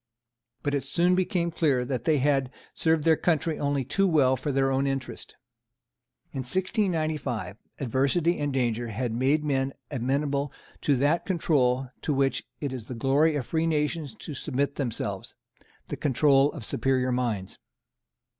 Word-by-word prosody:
But 145 - -1
it 140 -2 0
soon 175 +6 +2
became 180 -2 0
clear 140 -7 +1
that 125 -2 -3
they 155 -2 +3
had 135 -1 +2 0.2
served 160 -2 +1
their 160 0 +5
country 160 -1 0
only 140 -2 0
too 195 +9 +2
well 140 -6 +4
for 130 +3 -3
their 135 0 +2
own 135 +1 +1
interest. 135 -2 -4 1.0
In 135 - -5
1695 155 - -1 0.2
adversity 140 +7 +1
and 145 -1 -1
danger 120 -3 0
had 115 +2 -2
made 135 +6 +2
men 135 -2 0 0.2
amenable 140 +2 -1 0.3
to 145 - +3
that 145 +6 +1
control 135 -8 +1
to 150 - -1
which 135 0 +1
it 140 -3 -3
is 120 -4 -7
the 125 - -6
glory 140 +6 +3
of 135 -4 -2
free 165 +4 0
nations 150 -4 -1
to 150 - -8
submit 140 +1 -1
themselves, 110 -7 -3 0.5
the - - -4
control 140 0 +3
of 135 -9 -6
superior 130 +2 +1
minds. 115 -7 -2
140 Hz, 155 wpm, -27 LUFS, 130-155 Hz, 1.0 s, their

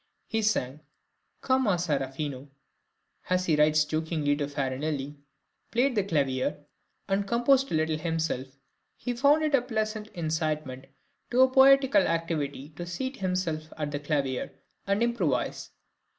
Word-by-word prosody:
He 225 - -1
sang 150 -10 0 0.6
"come 260 -2 +2
un 190 -3 +3
serafino" 140 -3 -3 0.8
(as 185 0 +1
he 160 - +3
writes 150 0 +4
jokingly 155 -2 0
to 145 -1 -2
Farinelli), 140 +1 -3 0.5
played 250 +3 +2
the 205 -4 +1
clavier, 140 -5 -1 0.4
and 200 0 0
composed 255 +4 +3
a - - +1
little 155 0 0
himself; 160 -5 -2 0.5
he 245 - -3
found 285 +5 +4
it 305 -1 0
a 275 - +5
pleasant 215 -3 -3
incitement 155 -5 -2 0.4
to 255 +2 +5
poetical 270 -4 +6
activity 155 -4 -2
to 160 +3 -8
seat 260 +10 -4
himself 175 -4 -2
at 150 -2 -3
the 145 - -3
clavier 140 -3 -2 0.4
and 200 +3 +2
improvise. 185 - -1
160 Hz, 135 wpm, -28 LUFS, 145-220 Hz, 0.8 s, poetical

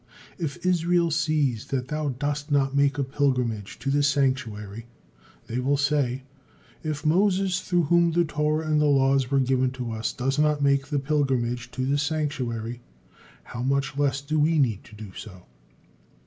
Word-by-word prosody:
If 170 +1 -4
Israel 175 -1 +2
sees 150 -7 0
that 130 -1 -3
thou 150 -1 -1
dost 145 +3 -3
not 140 -1 +2
make 140 0 +3
a 140 - +1
pilgrimage 125 -7 -1
to 135 - -2
the 145 +1 +2
sanctuary, 120 -7 -1 0.6
they 120 - -3
will 140 +3 +1
say, 140 -3 0 0.6
'If 155 -1 -4
Moses, 185 +2 +2
through 175 -2 +1
whom 170 +2 +3
the 170 +1 +2
Torah 150 +1 0
and 155 -1 +2
the 150 - +3
laws 135 -2 +3
were 140 0 +2
given 130 0 +2
to 125 -2 -5
us, 110 0 -2
does 135 +2 -1
not 150 -1 +2
make 140 -1 +2
the 145 -1 -1
pilgrimage 130 -4 0
to 130 - -2
the 140 +2 +1
sanctuary, 130 -7 -2 0.6
how 120 - -7
much 135 +1 0
less 140 -1 0
do 155 +2 -1
we 160 +2 +3
need 115 -8 +1
to 110 - -14
do 105 -2 -9
so!' 95 -4 -10
140 Hz, 170 wpm, -25 LUFS, 125-150 Hz, 0.6 s, make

